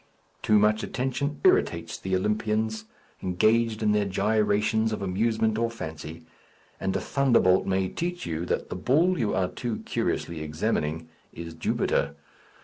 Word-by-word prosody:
Too 105 - +4
much 105 +1 +3
attention 135 +4 -2
irritates - - +2
the 95 0 -1
Olympians 110 +2 -1 0.4
engaged 110 +5 +2
in 105 - +3
their 105 -1 +2
gyrations 105 +2 +1
of 105 -2 -3
amusement 110 +3 +1
or 115 0 +1
fancy; 80 -6 -8 0.5
and 95 - -1
a - - +1
thunderbolt 120 -9 +3
may 95 0 +1
teach 175 - -4
you 80 0 -3
that - - -2
the - - -2
bull 160 - +2
you 110 -5 0
are 95 -1 +1
too 120 -4 -4
curiously 85 -2 -2
examining 75 +1 -2 0.2
is 85 0 -8
Jupiter. 80 - 0
105 Hz, 140 wpm, -26 LUFS, 90-115 Hz, 0.5 s, Too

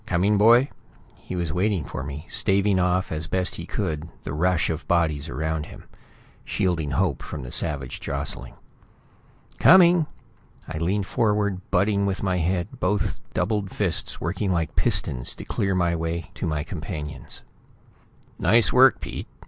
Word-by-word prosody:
"Coming, 100 +3 +2
boy?" 120 +5 +6 0.5
He - - -7
was 85 -2 -2
waiting 95 -3 0
for - - -5
me, 70 +3 -6
staving 100 -1 +2
off 90 0 +1
as 75 -1 -3
best 95 +1 0
he 85 - -7
could 80 -5 -3
the - - -5
rush 90 +2 +2
of 80 0 -5
bodies 80 -4 +1
around 80 +3 -2
him; - - -12 0.6
shielding 85 -7 -1
Hope 80 -4 0
from - - -6
the - - -8
savage 70 -4 +1
jostling. - - -2 1.0
"Coming!" 175 -3 +7 0.6
I 80 -1 -5
leaned 95 +4 0
forward, 105 -3 0
butting 100 +2 +2
with 95 0 -2
my 95 -2 +1
head, 90 +1 -2
both 100 +2 0 0.2
doubled 100 +1 0
fists 90 -5 -2
working 95 +4 -2
like 85 -3 -1
pistons 85 - 0
to - - -9
clear 95 -2 0
a 85 -1 +1
way 80 -1 -3
to - - -4
my 75 -2 -1
companions. 75 - -6 1.0
"Nice 115 -3 +4
work, 130 -2 +6
Pete!" - - -6
90 Hz, 150 wpm, -24 LUFS, 80-100 Hz, 1.0 s, Coming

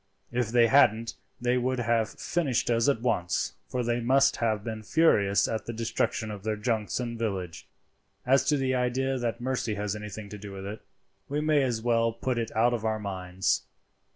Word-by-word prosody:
If 120 -1 0
they 120 0 +5
hadn't 115 -2 +4 0.3
they 125 +1 +1
would 130 +1 0
have 115 -2 +1
finished 140 -9 0
us 115 +3 +3
at 135 -5 +1
once, 90 -8 0
for 125 -1 -2
they 120 0 0
must 130 +3 +3
have 110 -3 0
been 110 -1 -5
furious 105 -6 +3
at 110 -2 -3
the 115 - -3
destruction 110 -1 -1
of 105 -2 -7
their 110 0 -1
junks 110 0 -1
and 120 -2 -4
village. 95 -6 -3 0.6
"As 130 +2 +4
to 150 - +3
the 130 -1 0
idea 130 +1 0
that 120 -1 -2
mercy 125 -4 -1
has 105 0 -2
anything 105 0 -7
to 105 - -8
do 100 0 -8
with 95 0 -7
it, 105 +2 -6 0.5
we 145 +2 -1
may 150 -1 +3
as 120 -4 -1
well 115 -1 +2
put 120 +1 -2
it 115 - -2
out 120 +2 +3
of 115 -3 -2
our 110 -1 0
minds. 95 -2 -1
115 Hz, 195 wpm, -28 LUFS, 105-125 Hz, 0.6 s, they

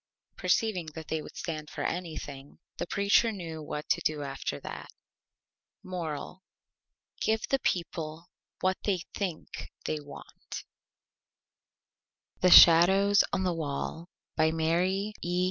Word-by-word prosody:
Perceiving 195 -7 +1
that 160 -1 -8
they 160 -1 -1
would - - -11
stand 155 -3 -5
for - - -5
Anything, 155 -5 -5 0.2
the - - -3
Preacher 200 +4 +3
knew 165 -6 -6
what 150 0 -5
to - - +2
do 150 -1 -1
after 135 -1 -4
that. - - -7 0.9
MORAL: 175 -1 -5 0.8
Give 220 0 +1
the 270 - +1
People 165 -5 -2 0.4
what 185 0 +2
they 185 -4 0
Think 180 -6 -5 0.2
they 155 - -1
want. 145 -1 -10 1.8
THE 180 - +4
SHADOWS 190 +5 +8
ON 190 - 0
THE 180 -1 +1
WALL 160 +2 -4 0.3
By 160 0 +3
MARY 180 +6 0
E. 175 +1 -1
170 Hz, 125 wpm, -29 LUFS, 155-190 Hz, 1.8 s, SHADOWS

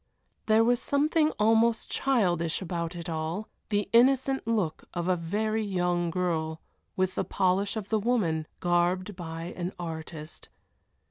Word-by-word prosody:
There 220 +1 +5
was 240 +1 +2
something 305 +2 +2
almost 225 +2 +3
childish 175 -11 +1
about 170 -2 -3
it 170 0 -6
all; 165 +5 -3 0.2
the 205 -1 0
innocent 265 +1 +4
look 205 -9 -1
of 175 0 -2
a 185 - +3
very 215 +6 -1
young 180 -3 0
girl, 160 -3 -1 0.4
with 185 0 +1
the - - -1
polish 190 +3 +1
of 210 -3 -5
the 220 - +2
woman, 190 -9 0
garbed 180 +3 +1
by 165 0 -6
an 180 +1 -4
artist. 160 -2 -7
185 Hz, 140 wpm, -28 LUFS, 170-220 Hz, 0.4 s, There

